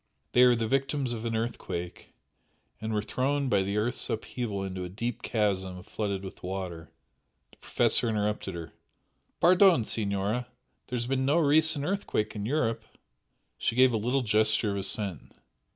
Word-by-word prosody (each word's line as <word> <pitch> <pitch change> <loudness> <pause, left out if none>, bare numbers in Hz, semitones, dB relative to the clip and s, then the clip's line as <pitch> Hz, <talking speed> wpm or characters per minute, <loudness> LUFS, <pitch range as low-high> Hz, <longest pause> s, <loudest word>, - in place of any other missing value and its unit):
They 125 - +5
are 125 -1 +7
the 115 -1 -1
victims 135 0 0
of 115 0 -5
an 115 -1 -1
earthquake, 95 -6 -5 0.7
and 110 0 -3
were 105 -1 0
thrown 135 +4 0
by 100 -4 +3
the 100 +2 -2
earth's 120 +4 0
upheaval 110 -3 -3
into 95 -1 -4
a 90 - -5
deep 115 +5 -4
chasm 95 -4 -1
flooded 100 -1 -3
by 95 - -6
water 90 -3 -5 0.4
" - - -48
The - - -22
Professor 120 - +1
interrupted 105 -3 -1
her. 85 -1 -7 0.7
"Pardon, 180 - +6
Signora! 105 +3 -1 0.4
There 125 - -3
has 120 - -2
been 130 +1 0
no 140 +4 +3
recent 155 -1 +4
earthquake 155 - -1
in 105 0 -3
Europe." 120 -5 0 0.8
She - - 0
gave 130 0 +5
a - - +2
little 125 +5 0
gesture 110 -1 +2
of 100 - -2
assent. 100 - -2
110 Hz, 165 wpm, -28 LUFS, 100-125 Hz, 0.8 s, are